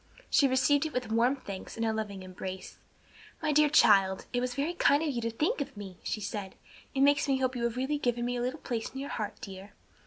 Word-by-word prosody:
She 280 - +5
received 280 +3 +3
it 310 - -10
with 250 -3 -2
warm 235 +4 +3
thanks 200 -8 -8
and 230 - 0
a 220 - +1
loving 205 -3 -4
embrace. 185 0 -7 0.6
"My 310 -2 0
dear 300 0 +5
child, 195 -8 +5
it 245 - +1
was 250 0 -2
very 290 +5 -1
kind 290 -3 +3
in 310 - 0
you 240 -3 -2
to 230 - -1
think 290 +6 0
of 275 - -5
me!" 195 -3 -8
she - - -3
said. 200 -1 -5 0.4
"It 270 - +1
makes 285 +2 +4
me 270 -1 +2
hope 260 -1 0
you 235 -1 -1
have 235 +1 -2
really 280 +3 0
given 240 -2 0
me 245 0 -1
a 240 - -2
little 255 +5 -3
place 230 -3 -3
in 265 - -8
your 280 - -5
heart, 210 -3 -4
dear." 195 +1 -9
245 Hz, 245 wpm, -30 LUFS, 210-280 Hz, 0.6 s, She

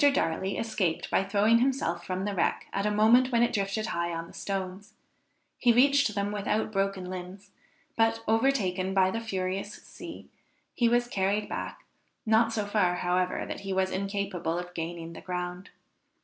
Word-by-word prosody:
Darley 190 +4 0
escaped 215 -7 -1
by - - +3
throwing 205 +4 +3
himself 245 -10 0
from 185 +2 -3
the 205 - -1
wreck 175 - 0
at 200 +1 0
a - - +2
moment 225 +5 +5
when 235 -1 +4
it 240 - +1
drifted 200 0 -1
high 170 -5 -2
on 165 0 -4
the - - -15
stones; 195 0 -5 0.6
he 245 - +5
reached 275 -1 +4
them 200 0 -1
without 210 +1 -1
broken 195 -2 -1
limbs, 185 +2 -8 0.4
but, 225 0 +2
overtaken 205 -6 +1
by 190 -1 +4
the 230 - -3
furious 195 -1 -3
sea, - - -10 0.5
he 235 -1 +3
was 240 +1 +2
carried 205 -1 0
back, - - -5 0.4
not 225 +1 +4
so 215 -2 -1
far, 200 -4 +2
however, 180 +1 0
that - - -5
he 195 -1 -5
was 190 0 +1
incapable 195 -4 -2
of 175 0 -4
regaining 170 -1 -5
the - - -9
ground. 180 +1 -5
195 Hz, 170 wpm, -28 LUFS, 185-220 Hz, 0.6 s, moment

